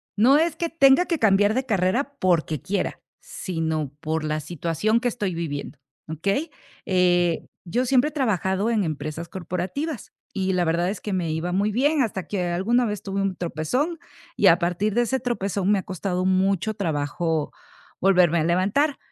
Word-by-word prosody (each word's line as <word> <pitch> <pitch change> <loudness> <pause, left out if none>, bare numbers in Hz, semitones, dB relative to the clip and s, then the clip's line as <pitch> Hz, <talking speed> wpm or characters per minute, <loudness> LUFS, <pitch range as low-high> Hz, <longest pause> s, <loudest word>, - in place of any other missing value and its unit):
no 260 +8 +5
es, 330 -1 +1
que 335 0 -2
tenga 275 +1 +5
que 335 -3 -1
cambiar 205 -1 +4
de 260 +2 -1
carrera 225 +7 0
porque 165 -4 +1
quiera, 195 +1 -2 0.2
sino 160 -5 -3
por 160 0 -2
la 155 0 -1
situación 170 +8 -1
que 245 - -1
estoy 205 -7 -2
viviendo, 150 -3 -5 0.3
¿okey?, 195 - -1 0.4
eh, 175 -2 +2 0.2
yo 240 +9 0
siempre 260 +3 +3
he - - -15
trabajado 205 - 0
en 220 -3 +1
empresas 155 +1 -4
corporativas, 190 - -4 0.2
y 190 -1 -1
la 180 -1 +1
verdad 170 +2 +1
es 195 -1 -5
que 210 - -4
me 175 -4 -1
iba 160 +3 -2
muy 200 +4 +1
bien, 285 +7 +2
hasta 195 -7 -2
que 185 -4 -2
alguna 210 +8 +1
vez 210 -1 -4
tuve 195 0 -2
un 195 -1 -1
tropezón, 250 - -2 0.4
y - - +4
a - - +7
partir 180 +4 -1
de 240 - +4
ese 260 +3 -1
tropezón 200 -6 -1
me 205 - +4
ha 190 - -3
costado 185 0 -3
mucho 190 +2 +1
trabajo 160 -3 -1 0.5
volverme 180 -3 +4
a - - +1
levantar, 195 - +1
190 Hz, 175 wpm, -24 LUFS, 170-235 Hz, 0.5 s, a